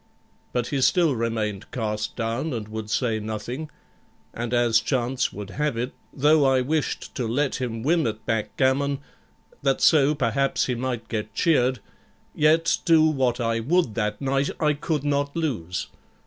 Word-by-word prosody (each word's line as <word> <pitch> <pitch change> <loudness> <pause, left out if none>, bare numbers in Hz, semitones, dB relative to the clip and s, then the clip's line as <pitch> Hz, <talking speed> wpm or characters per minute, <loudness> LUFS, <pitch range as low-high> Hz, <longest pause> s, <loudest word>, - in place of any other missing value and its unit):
But 120 -1 -1
he 140 -2 -1
still 150 +2 +3
remained 110 -3 -2
cast 105 -3 -3
down, 120 +6 -2
and 110 -3 -4
would 110 -1 -6
say 115 -1 0
nothing; 110 +8 -5 0.6
and 120 0 -4
as 120 -2 +4
chance 125 +2 0
would 100 0 -8
have 150 -2 -1
it, 125 +2 -2 0.2
though 150 +2 +4
I 135 -1 +4
wished 150 +4 -2
to 125 -4 -2
let 135 +5 0
him 115 -3 -3
win 160 -1 +2
at 110 0 -5
backgammon, 130 +5 +1 0.6
that 135 -1 +1
so, 150 -1 +5
perhaps, 135 0 +1
he 125 - -1
might 120 -2 -3
get 110 -1 -4
cheered, 130 -6 +2 0.5
yet 160 +2 +3
do 165 -2 +5
what 130 -5 +1
I 115 -1 0
would 145 0 +1
that 105 -2 -2
night 135 +1 0
I 150 -2 +3
could 150 0 -2
not 145 0 0
lose. 110 - -2
125 Hz, 160 wpm, -24 LUFS, 115-145 Hz, 0.6 s, so